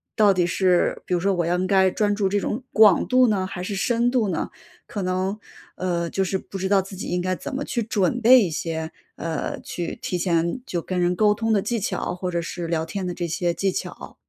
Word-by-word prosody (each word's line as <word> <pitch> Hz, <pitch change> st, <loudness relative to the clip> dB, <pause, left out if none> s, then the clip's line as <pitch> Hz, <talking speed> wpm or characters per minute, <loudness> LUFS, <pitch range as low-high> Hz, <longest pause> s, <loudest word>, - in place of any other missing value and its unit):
到 210 Hz, -2 st, +5 dB
底 180 Hz, -2 st, +2 dB
是 180 Hz, 0 st, +2 dB
比 -, -, -2 dB
如 175 Hz, -, +2 dB
说 195 Hz, +2 st, +2 dB
我 175 Hz, -2 st, 0 dB
要 175 Hz, +1 st, +1 dB
应 185 Hz, -, 0 dB
该 190 Hz, -1 st, +4 dB
专 205 Hz, +1 st, +1 dB
注 200 Hz, -1 st, +1 dB
这 205 Hz, -, +1 dB
种 215 Hz, +4 st, -3 dB
广 215 Hz, -3 st, +6 dB
度 255 Hz, 0 st, +5 dB
呢 195 Hz, -4 st, 0 dB
还 180 Hz, -, -5 dB
是 200 Hz, +2 st, -3 dB
深 235 Hz, +4 st, +1 dB
度 245 Hz, -4 st, +2 dB
呢？ -, -, -2 dB, 0.4 s
可 205 Hz, -, -4 dB
能， 185 Hz, +3 st, -1 dB, 0.4 s
呃， 170 Hz, -2 st, -1 dB
就 195 Hz, -, -2 dB
是 190 Hz, 0 st, -1 dB
不 195 Hz, -, -8 dB
知 190 Hz, 0 st, -2 dB
道 195 Hz, -1 st, +4 dB
自 195 Hz, +1 st, -10 dB
己 -, -, -5 dB
应 180 Hz, -, -1 dB
该 185 Hz, +1 st, 0 dB
怎 265 Hz, -, -6 dB
么 275 Hz, -, -2 dB
去 240 Hz, -, -2 dB
准 210 Hz, +1 st, 0 dB
备 250 Hz, +2 st, +8 dB
一 190 Hz, -, 0 dB
些， 160 Hz, 0 st, -3 dB, 0.2 s
呃， 165 Hz, -2 st, -3 dB
去 175 Hz, -2 st, -5 dB
提 180 Hz, -, -2 dB
前 170 Hz, +3 st, 0 dB
就 175 Hz, -8 st, -3 dB
跟 185 Hz, +1 st, -3 dB
人 175 Hz, 0 st, +2 dB
沟 210 Hz, +2 st, +4 dB
通 225 Hz, +1 st, 0 dB
的 205 Hz, -, +3 dB
技 230 Hz, +3 st, -1 dB
巧， 190 Hz, -, -2 dB
或 180 Hz, 0 st, -3 dB
者 170 Hz, -, -1 dB
是 170 Hz, 0 st, -5 dB
聊 165 Hz, -1 st, -1 dB
天 190 Hz, +3 st, -4 dB
的 180 Hz, -, -3 dB
这 175 Hz, -, -3 dB
些 170 Hz, +1 st, -1 dB
技 195 Hz, +2 st, 0 dB
巧。 -, -, -6 dB
190 Hz, 265 characters per minute, -23 LUFS, 175-210 Hz, 0.4 s, 备